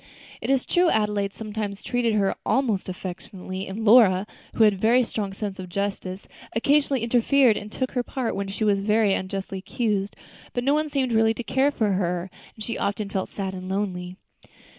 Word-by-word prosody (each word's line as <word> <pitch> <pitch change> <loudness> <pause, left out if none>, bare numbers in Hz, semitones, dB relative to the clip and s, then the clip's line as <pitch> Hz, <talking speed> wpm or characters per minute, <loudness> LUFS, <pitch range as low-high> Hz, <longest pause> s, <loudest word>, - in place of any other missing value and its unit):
It - - -4
is 270 -2 +2
true, 350 0 +3
Adelaide 210 -4 +1
sometimes 210 -2 -5
treated 240 -3 0
her 195 -2 +2
almost 230 -9 0
affectionately, 185 +1 -6
and 210 +4 -5
Lora, 205 -4 +6 0.3
who 225 - +4
had 210 -1 +6
a - - -6
very 235 +6 +4
strong 210 -4 -3
sense 195 -1 -5
of 185 -1 -7
justice, 195 0 -3 0.3
occasionally 275 +1 +2
interfered 245 +1 +4
and 205 +1 -6
took 260 +2 -2
her 250 - 0
part 245 -1 -3
when 200 0 -3
she 200 +3 -3
was 205 -2 +3
very 210 0 +3
unjustly 190 0 -3
accused, 205 0 -2 0.4
but 245 - -1
no 275 +3 +3
one 305 0 +1
seemed 270 -3 0
really 225 0 +3
to 240 - -5
care 265 +4 +2
for 220 -7 0
her, 180 -1 -1 0.2
and 220 - -8
she 230 - -4
often 200 0 -2
felt 190 -1 -2
sad 190 -2 -4
and 185 0 -7
lonely. 185 -2 -3
210 Hz, 190 wpm, -25 LUFS, 195-235 Hz, 0.4 s, Lora